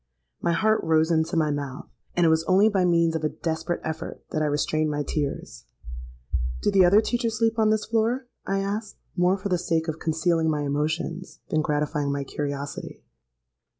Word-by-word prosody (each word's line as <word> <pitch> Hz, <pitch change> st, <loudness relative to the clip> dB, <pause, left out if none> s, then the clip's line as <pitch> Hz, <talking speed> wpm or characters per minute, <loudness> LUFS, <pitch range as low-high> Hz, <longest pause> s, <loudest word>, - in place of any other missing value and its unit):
'—My 170 Hz, -, +1 dB
heart 215 Hz, +6 st, +2 dB
rose 160 Hz, 0 st, +3 dB
into 160 Hz, +2 st, +1 dB
my 155 Hz, -2 st, +2 dB
mouth; 140 Hz, -2 st, -5 dB, 0.3 s
and 175 Hz, -, +3 dB
it -, -, +5 dB
was 160 Hz, 0 st, +3 dB
only 195 Hz, +4 st, +5 dB
by 190 Hz, -3 st, +2 dB
means 170 Hz, -2 st, +3 dB
of 160 Hz, -, -2 dB
a 155 Hz, -, +2 dB
desperate 165 Hz, +2 st, -3 dB
effort 160 Hz, +1 st, -5 dB
that 155 Hz, -, -1 dB
I -, -, +2 dB
restrained 150 Hz, +1 st, 0 dB
my 145 Hz, 0 st, -1 dB
tears.—'Do 60 Hz, -, -5 dB
the 195 Hz, -2 st, +6 dB
other 195 Hz, +4 st, +6 dB
teachers 230 Hz, -1 st, -1 dB
sleep 225 Hz, 0 st, +1 dB
on 215 Hz, -1 st, +4 dB
this 215 Hz, 0 st, +1 dB
floor?' 230 Hz, +3 st, 0 dB, 0.2 s
I 195 Hz, 0 st, -1 dB
asked, 205 Hz, +2 st, -4 dB, 0.2 s
more 180 Hz, +1 st, +3 dB
for 200 Hz, +1 st, -4 dB
the 180 Hz, -2 st, +1 dB
sake 165 Hz, -1 st, 0 dB
of 160 Hz, 0 st, -3 dB
concealing 160 Hz, 0 st, +1 dB
my 150 Hz, -1 st, 0 dB
emotions, 160 Hz, +5 st, -2 dB
than 155 Hz, -, +2 dB
gratifying 150 Hz, -1 st, -1 dB
my 140 Hz, 0 st, -2 dB
curiosity. 140 Hz, 0 st, -5 dB
160 Hz, 185 wpm, -25 LUFS, 150-190 Hz, 0.3 s, the